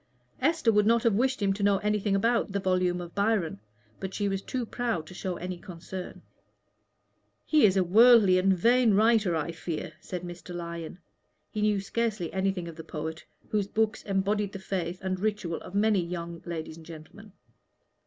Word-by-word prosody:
Esther 305 -4 +3
would 210 -1 +3
not 230 0 +4
have 230 -3 +3
wished 255 +2 +1
him 195 -1 +3
to 200 - -6
know 200 0 +4
anything 210 -1 0
about 230 +1 +1
the 200 - 0
volume 185 -2 +1
of 175 -1 -8
Byron, 200 - 0 0.4
but 190 0 -5
she 205 - 0
was 195 -1 -1
too 250 +3 -3
proud 230 -8 -2
to 170 - -12
show 185 0 -4
any 180 +1 -5
concern. 180 0 -8 1.2
"He 300 -8 +5
is 195 0 +1
a 190 - +4
worldly 210 0 +6
and 195 +1 +3
vain 230 +4 +4
writer, 215 -4 +3
I 160 +1 -2
fear," 165 -1 -5
said 180 -1 -6
Mr. 175 0 -8
Lyon. 170 -1 -6 0.5
He 215 - -3
knew 210 -1 +2
scarcely 210 -3 -2
anything 190 -2 -1
of 165 -1 -9
the 165 - -7
poet, 160 +1 -6 0.3
whose 205 -2 0
books 220 +1 0
embodied 200 +1 -1
the - - -4
faith 185 -2 -3
and 185 -1 -2
ritual 205 -5 -2
of 190 - -10
many 205 -2 +3
young 170 -1 -6
ladies 160 -1 -5
and 165 - -13
gentlemen. 170 +6 -12
195 Hz, 185 wpm, -28 LUFS, 175-215 Hz, 1.2 s, worldly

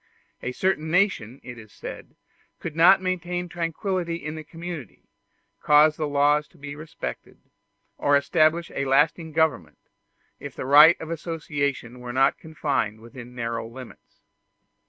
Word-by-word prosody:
A 125 - -3
certain 160 +1 -1
nation, 160 - +1
it 120 -1 -9
is 110 -2 -14
said, - - -9 0.4
could 160 - -6
not 180 +4 +6
maintain 180 -1 -2
tranquillity 175 +1 -2
in 155 -2 -6
the 155 0 -7
community, 165 - -8 0.6
cause 150 +1 +5
the 155 - -2
laws 145 +1 +2
to - - -24
be 145 0 -8
respected, 155 +1 -8 0.6
or 145 0 +4
establish 155 +3 +2
a 140 - -2
lasting 150 +4 +2
government, 160 -5 0 0.6
if - - -8
the - - -5
right 150 +5 +8
of 160 - -7
association 145 -6 -3
were 125 0 -7
not 135 +2 +2
confined 140 -9 -2
within 120 +1 -12
narrow 115 -1 -3
limits. 125 +2 -13
150 Hz, 140 wpm, -25 LUFS, 130-165 Hz, 0.6 s, right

